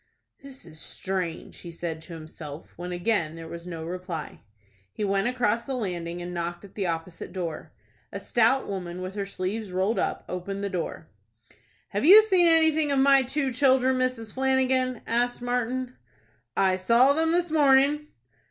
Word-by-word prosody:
"This 275 -1 -12
is 160 -2 -12
strange," 185 -1 -4
he 175 - -9
said 165 -1 -5
to 170 - -11
himself 155 -1 -10
when 180 +1 -6
again 175 -3 0
there 165 0 -8
was 170 +1 -8
no 165 -2 -6
reply. 175 -2 -6 0.5
He 210 - -5
went 195 +1 +1
across 235 -2 0
the 270 - -3
landing, 175 -6 -4
and 175 0 -6
knocked 175 +2 -4
at 195 - -16
the 200 - -2
door - - +2
opposite. 165 +3 -7 0.7
A 200 - -5
stout 240 +5 +2
woman, 185 -2 -5
with 185 +1 -5
her 200 -1 -4
sleeves 200 +3 -4
rolled 190 +5 0
up, - - -2
opened 195 +2 -5
the 200 - -2
door. 170 -3 -4 0.8
"Have 205 - -2
you 405 +8 +9
seen 375 -5 +4
anything 315 -2 +4
of 280 - +1
my 275 0 +6
two 265 +1 -2
children, 260 0 +3
Mrs. 250 -4 -2
Flanagan?" 260 -2 +1
asked 245 +1 0
Martin. 245 +1 -2 0.6
"I 190 -1 +3
saw 235 +8 +4
them 320 +2 +1
this 345 -1 0
morning." 290 0 +4
210 Hz, 170 wpm, -26 LUFS, 180-265 Hz, 0.8 s, you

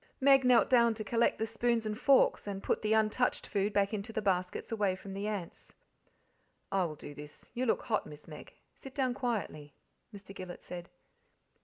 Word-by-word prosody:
Meg 270 0 +6
knelt 245 -3 +5
down 235 -3 +4
to 215 - -5
collect 230 +3 +1
the 220 - -1
spoons 230 0 0
and 215 0 -3
forks: 275 -6 +4
and 195 -1 -5
put - - 0
the 215 - -1
untouched 220 +3 +2
food 200 0 0
back 200 0 +1
into 210 +1 -4
the 220 - -2
baskets 185 -2 -1
away 205 -4 +1
from 195 +1 -9
the 200 +2 -3
ants. 200 -6 -6 1.0
"I 195 -2 +2
will 155 -2 -5
do 145 - -10
this 150 +1 -12
you 250 +1 -1
look - - +1
hot, 215 - -1
Miss 150 0 -12
Meg; 150 -2 -11 0.2
sit 265 -1 -12
down 260 -3 +1
quietly," 210 - -3 0.4
Mr. 200 -1 -11
Gillet 185 -2 -8
said. 175 0 -8
210 Hz, 190 wpm, -32 LUFS, 190-235 Hz, 1.0 s, Meg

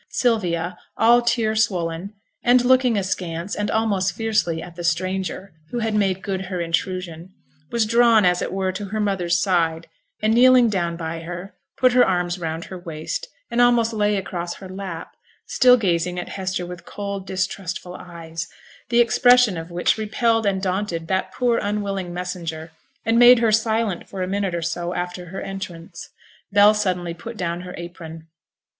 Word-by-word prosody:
Sylvia, 180 -7 0 0.2
all 235 +2 +5
tear 230 -2 +1
swollen, 185 -2 -1 0.3
and 245 0 +4
looking 255 -3 +4
askance 185 -1 -3
and 205 - -2
almost 200 -5 +1
fiercely 215 -7 0
at 175 +1 -9
the 175 - -7
stranger 185 +2 -2 0.2
who 245 - -4
had 225 -2 -1
made 195 -3 +1
good 190 -2 -3
her 185 -1 -4
intrusion, 170 +1 -3 0.3
was 235 -2 +1
drawn, 230 -2 +5
as 180 0 +3
it - - -3
were, 190 0 -1
to 200 +2 -5
her 215 +2 -4
mother's 185 -4 +1
side, 170 -4 +1 0.3
and, 215 +1 +2
kneeling 250 0 +6
down 170 -4 -1
by 165 -1 -4
her, 175 +4 -7 0.2
put 255 -1 +4
her 250 0 +6
arms 180 -1 0
round 165 0 -4
her 185 - -8
waist, 165 - -5 0.2
and 240 - +2
almost 235 -2 +4
lay 210 -1 +1
across 175 -3 -4
her 190 - -10
lap, 185 -3 -7 0.3
still 250 -1 +5
gazing 180 -4 0
at 175 - -6
Hester 185 -2 -3
with 175 -1 -9
cold, 200 0 -6
distrustful 185 -1 -3
eyes, 165 -2 -7 0.4
the 240 0 +5
expression 245 -2 +5
of 165 0 -6
which 175 +5 +1
repelled 225 +1 +1
and 190 -1 0
daunted 185 -3 -2
that 190 0 0
poor, 245 -2 +1
unwilling 200 -3 -2
messenger, 170 -3 -5 0.3
and 225 +1 +3
made 245 +1 +9
her 230 -1 +2
silent 220 -3 0
for 190 -1 -4
a - - -2
minute 195 -2 -1
or 170 - -3
so 175 +1 -3
after 180 0 -4
her 190 +3 -6
entrance. 180 -3 -7 0.4
Bell 205 +1 +6
suddenly 180 -5 -1
put 225 +7 -9
down 175 -2 -2
her 180 0 -8
apron. 165 -2 -9
190 Hz, 170 wpm, -22 LUFS, 175-215 Hz, 0.4 s, made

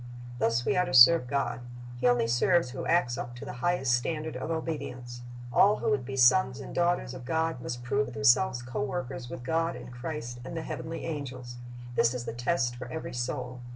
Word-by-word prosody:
"^ - - -12 0.4
Thus 115 0 +1
we - - +1
are 180 0 +3
to - - -2
serve 125 +2 +8
God. 140 -2 -1 0.4
He 125 - +2
only 120 -1 +3
serves 125 +5 +2
who 130 - -5
acts 125 -8 +2
up 120 - -6
to 120 - -8
the - - -6
highest 155 -7 +1
standard 155 +5 -1
of - - -4
obedience. 125 -7 -4 0.3
All 205 +2 +6
who - - 0
would 135 -3 0
be 135 - -5
sons 130 +1 +4
and 135 - -8
daughters 175 -7 +1
of 130 -1 -8
God 160 0 -1
must 120 0 -5
prove 135 +1 0
themselves 120 - +3
co 120 0 -4
workers 130 -2 -4
with 120 - -7
God 165 +4 0
and - - -9
Christ 120 -1 -6
and 145 +6 -6
the 160 - -3
heavenly 165 +1 -5
angels. 130 -6 -6 0.4
This 120 0 +2
is 120 -1 -4
the - - -4
test 120 0 0
for 125 0 -7
every 160 +6 -6
soul. 125 +1 -4
130 Hz, 210 wpm, -29 LUFS, 120-160 Hz, 0.4 s, serve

